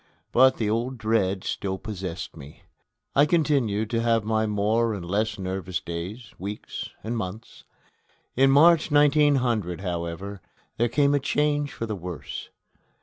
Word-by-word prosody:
But 130 Hz, +1 st, +5 dB
the 110 Hz, -, -1 dB
old 120 Hz, +4 st, -1 dB
dread 110 Hz, -4 st, 0 dB
still 95 Hz, -1 st, -3 dB
possessed 95 Hz, -5 st, -6 dB
me. 70 Hz, +2 st, -12 dB, 0.5 s
I 145 Hz, +2 st, +5 dB
continued 135 Hz, -, +1 dB
to 115 Hz, -1 st, +1 dB
have 115 Hz, -1 st, +2 dB
my 110 Hz, 0 st, +1 dB
more 110 Hz, +2 st, +1 dB
and 90 Hz, -4 st, -6 dB
less 105 Hz, +4 st, -1 dB
nervous 95 Hz, -1 st, -3 dB
days, 95 Hz, +6 st, -6 dB
weeks, 100 Hz, +3 st, -6 dB
and 115 Hz, +3 st, -3 dB
months. 110 Hz, +1 st, -6 dB, 0.7 s
In 135 Hz, +2 st, +5 dB
March, 160 Hz, +4 st, +6 dB
1900, 140 Hz, -, +3 dB
however, 90 Hz, +2 st, -4 dB, 0.4 s
there 120 Hz, +1 st, +2 dB
came 145 Hz, +2 st, +3 dB
a 145 Hz, -, +3 dB
change 145 Hz, +1 st, 0 dB
for 115 Hz, -, -4 dB
the 110 Hz, -2 st, -3 dB
worse. 90 Hz, -3 st, -7 dB
110 Hz, 145 wpm, -25 LUFS, 95-130 Hz, 0.7 s, March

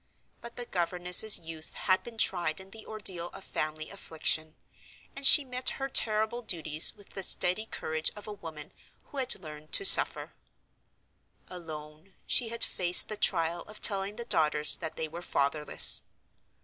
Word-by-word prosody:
But 235 Hz, 0 st, -12 dB
the 245 Hz, -, -7 dB
governess's 180 Hz, +2 st, +1 dB
youth 160 Hz, -1 st, -9 dB
had 185 Hz, -1 st, -1 dB
been 235 Hz, -1 st, -13 dB
tried 175 Hz, -6 st, 0 dB
in 190 Hz, 0 st, -14 dB
the 220 Hz, 0 st, -13 dB
ordeal 190 Hz, -5 st, -2 dB
of -, -, -12 dB
family 155 Hz, -2 st, -6 dB
affliction; 160 Hz, -4 st, -2 dB, 0.6 s
and 275 Hz, 0 st, +1 dB
she 295 Hz, -3 st, +7 dB
met 255 Hz, 0 st, -1 dB
her 270 Hz, -, -5 dB
terrible 220 Hz, 0 st, +2 dB
duties 160 Hz, -7 st, +1 dB
with 205 Hz, -2 st, -19 dB
the 195 Hz, -, -8 dB
steady 185 Hz, +3 st, 0 dB
courage 160 Hz, -5 st, -2 dB
of 210 Hz, -, -12 dB
a 210 Hz, -, -8 dB
woman 160 Hz, -6 st, -12 dB, 0.4 s
who 285 Hz, -, -11 dB
had 260 Hz, -5 st, -1 dB
learned 155 Hz, -3 st, -13 dB
to 395 Hz, -, +3 dB
suffer. -, -, +5 dB, 1.2 s
Alone, 155 Hz, 0 st, -12 dB
she 240 Hz, -, +2 dB
had 235 Hz, 0 st, +1 dB
faced 180 Hz, -1 st, +5 dB
the 215 Hz, -, -5 dB
trial 170 Hz, -4 st, -1 dB
of 215 Hz, -, -14 dB
telling 200 Hz, 0 st, -1 dB
the 235 Hz, -, -8 dB
daughters 150 Hz, -6 st, 0 dB
that 160 Hz, -, -8 dB
they 160 Hz, -, -5 dB
were 165 Hz, +3 st, -10 dB
fatherless. 150 Hz, -2 st, +2 dB
180 Hz, 160 wpm, -27 LUFS, 155-215 Hz, 1.2 s, she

